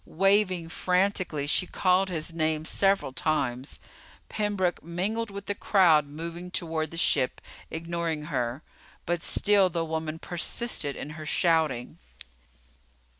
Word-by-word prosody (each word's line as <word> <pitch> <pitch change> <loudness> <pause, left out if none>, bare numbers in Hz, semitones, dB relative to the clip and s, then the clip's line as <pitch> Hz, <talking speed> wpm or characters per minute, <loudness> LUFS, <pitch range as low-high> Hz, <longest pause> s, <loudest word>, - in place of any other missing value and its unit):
Waving 190 -1 +2
frantically, 180 -5 0
she 165 +5 +2
called 185 +1 +2
his 165 -1 -2
name 155 -1 0
several 195 -7 +1
times. 135 -3 -1 0.5
Pembroke 200 -5 -1
mingled 200 +7 -2
with 200 0 -8
the 205 - -1
crowd 170 -8 +4
moving 170 +4 -7
toward 160 -3 -2
the 165 - -8
ship, 130 -6 +2 0.3
ignoring 165 -1 -3
her. 125 -3 -3 0.4
But 175 0 -1
still 200 +1 +4
the 165 -1 -2
woman 160 0 -3
persisted 175 -2 -1
in 150 - -6
her 155 0 -8
shouting. 155 -8 +1
170 Hz, 125 wpm, -27 LUFS, 155-185 Hz, 0.5 s, crowd